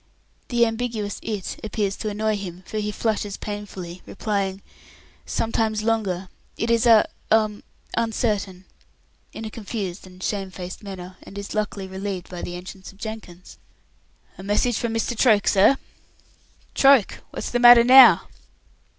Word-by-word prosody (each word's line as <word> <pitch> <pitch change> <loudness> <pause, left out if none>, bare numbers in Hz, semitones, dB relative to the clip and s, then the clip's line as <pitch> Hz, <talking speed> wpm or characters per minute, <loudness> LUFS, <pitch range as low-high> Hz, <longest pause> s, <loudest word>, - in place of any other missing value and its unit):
The 240 -2 +3
ambiguous 225 -3 -3
"it" 210 -4 -5
appears 210 -2 -2
to 215 - -3
annoy 215 +1 -1
him, 185 -2 -7
for 215 - -4
he 210 0 -2
flushes 210 -2 -2
painfully, 195 -4 -7
replying, 200 -3 -2 0.6
"Sometimes 220 -1 -1
longer. 200 -5 -1 0.3
It 230 +1 -1
is, 230 +1 +3
a 225 -2 +6 0.2
um 215 -1 +2 0.3
uncertain," 205 -5 -1 0.7
in 220 - -7
a 215 - -6
confused 200 -4 -5
and 185 0 -13
shame 195 -2 -2
faced 185 -1 -8
manner, 185 -3 -9
and 200 - -12
is 200 0 -6
luckily 210 -2 -2
relieved 190 -1 -5
by 180 - -6
the 175 - -5
entry 185 +2 -9
of 190 +1 -12
Jenkins. 210 -5 -9 0.8
"A - - -6
message 205 +4 +1
from 235 - -2
Mr. 225 +2 -1
Troke, 215 -3 +3
sir." 205 +7 +5 1.0
"Troke! 270 -6 +4
What's - - -5
the 245 - +1
matter 240 -1 +9
now?" 260 +2 +8
210 Hz, 145 wpm, -23 LUFS, 190-225 Hz, 1.0 s, matter